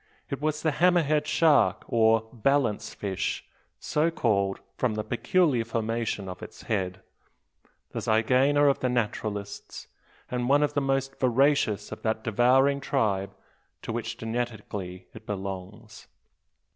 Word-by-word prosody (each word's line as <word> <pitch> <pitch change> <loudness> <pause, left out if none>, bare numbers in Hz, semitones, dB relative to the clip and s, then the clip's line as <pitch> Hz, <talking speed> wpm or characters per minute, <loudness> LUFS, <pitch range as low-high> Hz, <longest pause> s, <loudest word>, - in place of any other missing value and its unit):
It 140 - -3
was 155 0 -1
the 160 - +2
"hammer 175 +3 +4
head" 150 0 +1
shark, 155 -1 +3
or 110 -1 +3
balance 125 -2 +1
fish, 95 -2 -3 0.3
so 155 +2 +1
called 100 -10 0 0.2
from 120 -4 0
the 105 - -2
peculiar 125 +2 +1
formation 115 -3 -2
of 90 -1 -7
its - - -10
head, 95 -3 -2 0.9
the - - -3
zygaena 130 +6 +3
of 140 - +3
the 125 - 0
naturalists, 105 -4 -3 0.5
and 125 0 -1
one 145 +2 +5
of 145 0 0
the 145 - +1
most 135 0 -1
voracious 130 -3 +2
of - - -7
that 110 0 -1
devouring 130 +5 +3
tribe 105 -9 0 0.5
to 115 - -4
which 115 0 -4
genetically 110 -6 -4
it - - -13
belongs. 100 +3 -7
115 Hz, 135 wpm, -27 LUFS, 105-140 Hz, 0.9 s, one